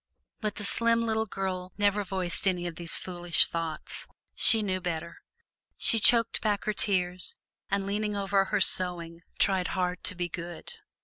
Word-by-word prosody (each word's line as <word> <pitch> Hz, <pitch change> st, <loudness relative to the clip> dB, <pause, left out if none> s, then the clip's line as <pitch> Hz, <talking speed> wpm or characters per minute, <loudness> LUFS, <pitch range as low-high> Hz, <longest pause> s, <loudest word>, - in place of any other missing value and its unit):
But 210 Hz, -2 st, -3 dB
the 210 Hz, -, -7 dB
slim 230 Hz, +2 st, +4 dB
little 220 Hz, 0 st, -1 dB
girl 185 Hz, -2 st, -5 dB
never 205 Hz, 0 st, +1 dB
voiced 185 Hz, -1 st, 0 dB
any 180 Hz, -2 st, 0 dB
of 170 Hz, -2 st, -5 dB
these 170 Hz, 0 st, +2 dB
foolish 175 Hz, -2 st, +3 dB
thoughts; 165 Hz, -2 st, -6 dB, 0.3 s
she 225 Hz, -2 st, +5 dB
knew 185 Hz, -2 st, -2 dB
better. 170 Hz, -1 st, -5 dB, 0.6 s
She 225 Hz, -, +3 dB
choked 230 Hz, +1 st, +4 dB
back 210 Hz, -2 st, -1 dB
her 215 Hz, -, 0 dB
tears 180 Hz, -3 st, -1 dB, 0.3 s
and 200 Hz, 0 st, -1 dB
leaning 210 Hz, +1 st, -2 dB
over 195 Hz, -1 st, +1 dB
her 205 Hz, 0 st, -1 dB
sewing 170 Hz, -3 st, +1 dB, 0.2 s
tried 190 Hz, -3 st, +1 dB
hard 180 Hz, -1 st, -2 dB
to -, -, -2 dB
be 175 Hz, 0 st, -3 dB
"good." 170 Hz, 0 st, -8 dB
190 Hz, 165 wpm, -27 LUFS, 175-205 Hz, 0.6 s, she